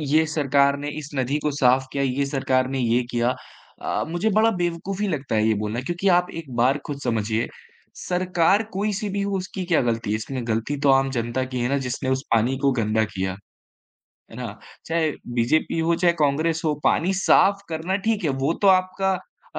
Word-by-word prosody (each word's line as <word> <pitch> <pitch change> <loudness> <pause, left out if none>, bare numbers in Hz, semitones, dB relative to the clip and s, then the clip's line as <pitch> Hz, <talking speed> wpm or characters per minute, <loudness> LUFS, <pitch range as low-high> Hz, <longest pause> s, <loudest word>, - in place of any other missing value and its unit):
ये 160 - +5
सरकार 140 -1 +3
ने 145 +1 -4
इस 150 0 -8
नदी 135 +3 0
को 150 - +2
साफ़ 130 -1 +3
किया, 140 0 0
ये 135 +1 0
सरकार 130 -2 0
ने 135 - -1
ये 120 0 +2
किया। 120 +1 +1 0.5
अ, - - -1
मुझे 175 +6 0
बड़ा 225 +1 +4
बेवकूफ़ी 185 +4 -2
लगता 145 -9 -2
है 110 0 +3
ये 110 - +3
बोलना 110 +4 -2
क्योंकि 175 +7 -2
आप 180 0 0
एक 140 -5 -15
बार 125 +4 +3
ख़ुद 140 -1 -5
समझिए, 110 0 0 0.6
सरकार 180 +3 +2
कोई-सी 205 +1 -1
भी 200 - 0
हो 200 -1 -1
उसकी 185 0 -5
क्या 160 - +4
ग़लती 115 -2 -1
है? 110 - +2
इसमें 120 +2 -4
ग़लती 115 +6 -1
तो - - +5
आम 135 0 +3
जनता 120 +3 -1
की 125 - -2
है 120 - 0
ना 140 - +1
जिसने 130 +1 -3
उस 130 +1 0
पानी 120 +4 +2
को 140 0 +2
गंदा 110 +1 +1
किया। 95 0 -2 1.0
है - - -11
ना? - - -4 0.4
चाहे 160 -1 +1 0.3
बीजेपी 150 +7 +1
हो, 165 +1 +2
चाहे 170 0 +3
कांग्रेस 155 +3 +1
हो, 155 -2 +2
पानी 185 +4 +2
साफ़ 200 +1 +4
करना 165 +4 -2
ठीक 215 -4 0
है 150 - +2
वो 150 - +3
तो 200 - +6
आपका 190 +1 -2 0.4
अ - - -1
145 Hz, 200 wpm, -23 LUFS, 125-175 Hz, 1.0 s, तो